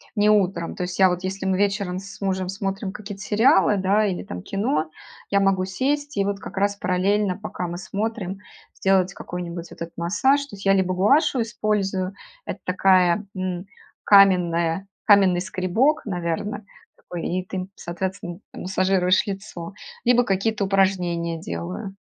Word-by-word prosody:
не 210 Hz, 0 st, +3 dB
утром. 190 Hz, -5 st, +1 dB
То -, -, -3 dB
есть 180 Hz, 0 st, -4 dB
я 190 Hz, -1 st, +6 dB
вот— 180 Hz, 0 st, -2 dB
если 190 Hz, +1 st, -4 dB
мы 190 Hz, -1 st, +1 dB
вечером 200 Hz, -2 st, 0 dB
с 200 Hz, +2 st, -11 dB
мужем 190 Hz, -1 st, -1 dB
смотрим 195 Hz, +1 st, -3 dB
какие-то 205 Hz, -2 st, -8 dB
сериалы, 210 Hz, -2 st, +4 dB
да, 200 Hz, +2 st, +2 dB
или, 190 Hz, -3 st, -2 dB
там, 90 Hz, 0 st, -7 dB
кино— 160 Hz, -6 st, -1 dB, 0.4 s
я 200 Hz, 0 st, +3 dB
могу 195 Hz, -1 st, +2 dB
сесть 285 Hz, +9 st, -1 dB
и 200 Hz, -, +2 dB
вот 200 Hz, 0 st, -2 dB
как -, -, -9 dB
раз 200 Hz, +1 st, +1 dB
параллельно, 190 Hz, +1 st, +1 dB
пока 200 Hz, -4 st, -5 dB
мы 175 Hz, 0 st, -5 dB
смотрим, 200 Hz, 0 st, -4 dB, 0.4 s
сделать 190 Hz, -1 st, +2 dB
какой-нибудь 175 Hz, -2 st, -6 dB
вот -, -, -13 dB
этот 165 Hz, 0 st, -7 dB
массаж. 205 Hz, +12 st, +2 dB
То 245 Hz, -, -11 dB
есть 195 Hz, -, -11 dB
я 195 Hz, -, +5 dB
либо 185 Hz, -1 st, +2 dB
гуаша 270 Hz, -, +3 dB
использую, 205 Hz, -4 st, -1 dB, 0.3 s
это -, -, -5 dB
такая, 185 Hz, +1 st, +3 dB
м, 185 Hz, -1 st, -3 dB, 0.4 s
каменная 180 Hz, -2 st, +4 dB, 0.2 s
каменный 195 Hz, -4 st, +5 dB
скребок, 205 Hz, -, +1 dB
наверно, 200 Hz, +2 st, -3 dB, 0.3 s
такой, 175 Hz, -2 st, -7 dB
и 185 Hz, +1 st, -2 dB
ты 190 Hz, -, -7 dB
им, 185 Hz, 0 st, -4 dB
соответственно, 175 Hz, 0 st, -5 dB
м -, -, -8 dB
массажируешь 185 Hz, 0 st, +2 dB
лицо, 195 Hz, -3 st, -6 dB, 0.3 s
либо 245 Hz, 0 st, +4 dB
какие-то 200 Hz, +1 st, 0 dB
упражнения 180 Hz, -4 st, +1 dB
делаю. 90 Hz, -, -5 dB
190 Hz, 160 wpm, -23 LUFS, 180-205 Hz, 0.4 s, я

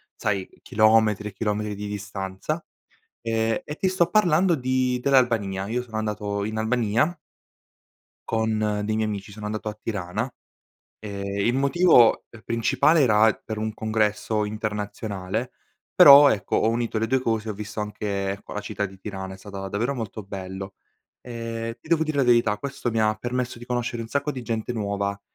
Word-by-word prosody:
sai, 100 Hz, -4 st, -1 dB
chilometri 110 Hz, -1 st, +3 dB
e 100 Hz, -, -16 dB
chilometri 105 Hz, 0 st, -2 dB
di 105 Hz, +1 st, -6 dB
distanza, 100 Hz, -, -4 dB, 0.6 s
ehm, 115 Hz, 0 st, 0 dB
e 150 Hz, -, -7 dB
ti 190 Hz, -, +1 dB
sto 185 Hz, -2 st, +2 dB
parlando 175 Hz, -2 st, +3 dB
di 130 Hz, -2 st, 0 dB
dell'Albania. 115 Hz, -8 st, +2 dB
Io 120 Hz, +3 st, -1 dB
sono 110 Hz, -3 st, -6 dB
andato 105 Hz, -2 st, -2 dB
in 110 Hz, +1 st, -4 dB
Albania 115 Hz, +6 st, +1 dB, 1.2 s
con 110 Hz, -1 st, +1 dB, 0.3 s
dei 110 Hz, +1 st, -1 dB
miei 110 Hz, 0 st, 0 dB
amici. 100 Hz, -1 st, -5 dB
Sono 105 Hz, +1 st, -7 dB
andato 110 Hz, 0 st, -3 dB
a 105 Hz, -, -12 dB
Tirana. 105 Hz, +3 st, -3 dB, 0.7 s
Ehm, 100 Hz, -2 st, -6 dB, 0.2 s
il 120 Hz, -, +3 dB
motivo, 140 Hz, -2 st, +5 dB
uhm, 115 Hz, -, -13 dB
principale 115 Hz, +8 st, +3 dB
era 110 Hz, -3 st, +5 dB
per 110 Hz, -1 st, -4 dB
un 110 Hz, 0 st, -2 dB
congresso 110 Hz, 0 st, 0 dB
internazionale, 105 Hz, -2 st, -4 dB, 0.4 s
però 140 Hz, 0 st, +10 dB
ecco, 105 Hz, -, -1 dB
ho 110 Hz, -, +3 dB
unito 115 Hz, -1 st, -1 dB
le 110 Hz, -, +1 dB
2 130 Hz, +4 st, +1 dB
cose, 115 Hz, -2 st, -1 dB
ho -, -, -2 dB
visto 105 Hz, +1 st, -5 dB
anche 100 Hz, -2 st, -3 dB
co -, -, -9 dB
la 105 Hz, -, -3 dB
città 105 Hz, 0 st, -3 dB
di 95 Hz, 0 st, -14 dB
Tirana, 95 Hz, -1 st, -6 dB
è -, -, -14 dB
stata 95 Hz, 0 st, -7 dB
davvero 115 Hz, +8 st, -1 dB
molto 110 Hz, -4 st, -5 dB
bello. 95 Hz, 0 st, -7 dB, 0.5 s
Ehm, 115 Hz, -1 st, -5 dB
ti -, -, -17 dB
devo 160 Hz, -1 st, +3 dB
dire 155 Hz, -2 st, -3 dB
la 140 Hz, -, +4 dB
verità, 120 Hz, -4 st, +3 dB
questo 135 Hz, +2 st, -4 dB
mi 115 Hz, -1 st, -1 dB
ha 110 Hz, 0 st, +3 dB
permesso 125 Hz, +2 st, -3 dB
di 120 Hz, -, -10 dB
conoscere 120 Hz, -1 st, -2 dB
un 115 Hz, -, -6 dB
sacco 140 Hz, +4 st, -1 dB
di 130 Hz, -3 st, -6 dB
gente 115 Hz, +1 st, -3 dB
nuova, 100 Hz, -2 st, -2 dB
110 Hz, 175 wpm, -24 LUFS, 105-120 Hz, 1.2 s, però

